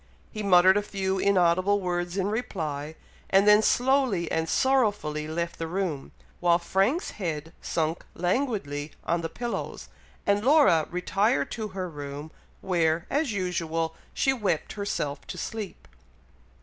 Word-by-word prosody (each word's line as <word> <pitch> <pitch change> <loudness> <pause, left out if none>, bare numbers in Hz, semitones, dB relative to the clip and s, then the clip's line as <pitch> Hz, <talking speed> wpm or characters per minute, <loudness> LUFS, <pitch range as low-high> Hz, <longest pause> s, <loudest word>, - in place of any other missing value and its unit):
He 215 - -5
muttered 190 -1 +6
a - - +2
few 195 -2 -2
inaudible 185 +1 +3
words 175 -1 -2
in 190 - +1
reply, 155 -9 -3 0.3
and 195 +1 +4
then 210 0 +7
slowly 245 - +2
and 160 0 0
sorrowfully 205 - +1
left 170 +2 -3
the 165 - -2
room, 170 -5 -3 0.3
while 170 -1 +4
Frank's 195 - 0
head 160 -4 -4
sunk 160 0 -1
languidly 175 - -1
on 170 0 0
the 165 - -3
pillows, 240 +7 -5 0.4
and 200 +1 +2
Laura 265 - +5
retired 195 +6 0
to 220 -2 -3
her 185 -1 -2
room, 145 -1 -7 0.3
where, 170 -2 +1
as 290 -2 +1
usual, 165 -4 -1 0.2
she 270 - +2
wept 205 -10 -1
herself 180 -8 -3
to - - -6
sleep. 215 -3 -6
180 Hz, 135 wpm, -27 LUFS, 165-210 Hz, 0.4 s, then